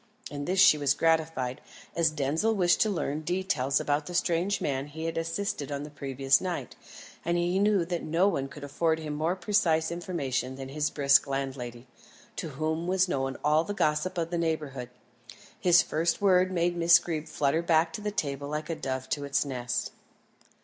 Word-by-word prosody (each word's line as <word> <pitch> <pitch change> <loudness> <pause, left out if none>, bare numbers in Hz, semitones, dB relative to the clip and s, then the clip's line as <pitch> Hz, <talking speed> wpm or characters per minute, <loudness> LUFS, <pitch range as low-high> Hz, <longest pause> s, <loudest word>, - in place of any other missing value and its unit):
In 145 -1 -5
this 185 +3 0
she 190 -5 +7
was 140 -1 +2
gratified, 160 -6 0 0.3
as 165 -1 +3
Denzil 155 +9 0
wished 180 0 +3
to 220 - +3
learn 155 -6 -2
details 155 -6 0
about 145 +1 -1
the 175 - -6
strange 175 +3 +1
man 135 0 -2
he 160 +2 -7
had 165 - -2
assisted 165 -3 -3
on 140 0 -3
the 150 - -9
previous 135 -1 +1
night, 175 -9 -4 0.5
and 170 +1 0
he 175 +2 +1
knew 200 -3 +3
that 175 0 -3
no 165 +5 +2
one 140 -9 -1
could 140 +1 -11
afford 160 +3 0
him 155 -2 -5
more 160 +4 0
precise 170 -5 +1
information 140 -7 -3
than 135 0 -7
his 150 +2 -1
brisk 140 -1 +4
landlady, 130 -3 -4 0.5
to 160 - -4
whom 160 +2 -1
was 190 0 +2
known 135 -5 -2
all 150 +2 +3
the 205 +3 -5
gossip 155 +2 0
of 165 0 -2
the 170 - -1
neighbourhood. 150 -6 -2 0.7
His 175 -3 +5
first 165 +2 0
word 185 -2 +4
made 175 -1 0
Miss 170 0 +6
Greeb 160 -2 -4
flutter 155 +1 0
back 165 -1 +2
to 215 - -5
the 210 - -2
table 140 -8 -3
like 150 +2 -4
a - - -2
dove 130 -3 -4
to 145 - -2
its 140 +1 0
nest. 125 -3 -3
160 Hz, 190 wpm, -28 LUFS, 140-175 Hz, 0.7 s, she